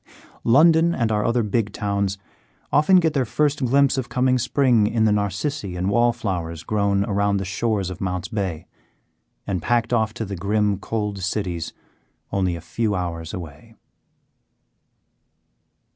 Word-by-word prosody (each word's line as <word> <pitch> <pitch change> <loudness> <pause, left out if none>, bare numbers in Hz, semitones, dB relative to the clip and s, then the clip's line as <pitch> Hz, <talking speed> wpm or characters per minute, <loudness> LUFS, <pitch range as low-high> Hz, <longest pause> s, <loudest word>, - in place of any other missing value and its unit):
London 160 +6 +5
and 115 -3 0
our 105 -1 +1
other 115 +1 +1
big 105 0 -1
towns 100 -1 -1 0.6
often 155 +6 +5
get 165 -4 +4
their 135 - +2
first 145 +4 0
glimpse 135 +2 +3
of 120 - -5
coming 130 0 +2
spring 120 -4 +3
in 110 0 +1
the 110 - +3
narcissi 105 - -2
and 90 +2 -1
wallflowers 100 -9 0
grown 100 -2 +1
around 100 0 +1
the 95 - -3
shores 100 -1 -1
of 90 - -9
Mounts 90 -1 -2
Bay, 95 -8 -3 0.8
and 95 -4 -2
packed 120 0 0
off 110 -2 +2
to 115 - -3
the 100 0 -5
grim 100 +1 0
cold 105 -2 -3
cities 90 -3 -2 0.6
only 95 -3 0
a 85 - -8
few 105 +5 -1
hours 85 -3 -4
away. 80 -5 -9
105 Hz, 145 wpm, -22 LUFS, 95-120 Hz, 0.8 s, London